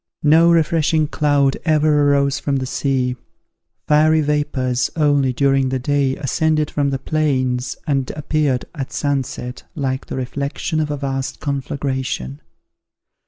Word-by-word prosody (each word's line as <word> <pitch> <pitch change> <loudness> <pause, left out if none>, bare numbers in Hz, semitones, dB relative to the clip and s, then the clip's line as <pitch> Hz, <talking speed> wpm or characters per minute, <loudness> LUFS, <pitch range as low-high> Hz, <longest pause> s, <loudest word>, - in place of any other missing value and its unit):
No 160 +3 +5
refreshing 160 -1 +2
cloud 145 -2 +1
ever 150 -2 +3
arose 140 -1 +2
from 140 - -1
the 130 -1 -1
sea: 130 -1 -1 0.7
fiery 155 +1 +4
vapours, 145 -4 0
only, 145 -4 +2
during 135 0 +2
the 130 - -1
day, 135 0 0
ascended 155 +2 0
from 145 -1 0
the 135 - -1
plains, 130 -4 -1
and 135 -3 0
appeared, 150 -4 0
at 135 -6 -5
sunset, 135 -3 -3
like 135 -3 -2
the - - -5
reflection 140 +4 -3
of 155 -1 -1
a 145 - -2
vast 135 -1 -3
conflagration. 130 - -3
140 Hz, 130 wpm, -19 LUFS, 130-150 Hz, 0.7 s, No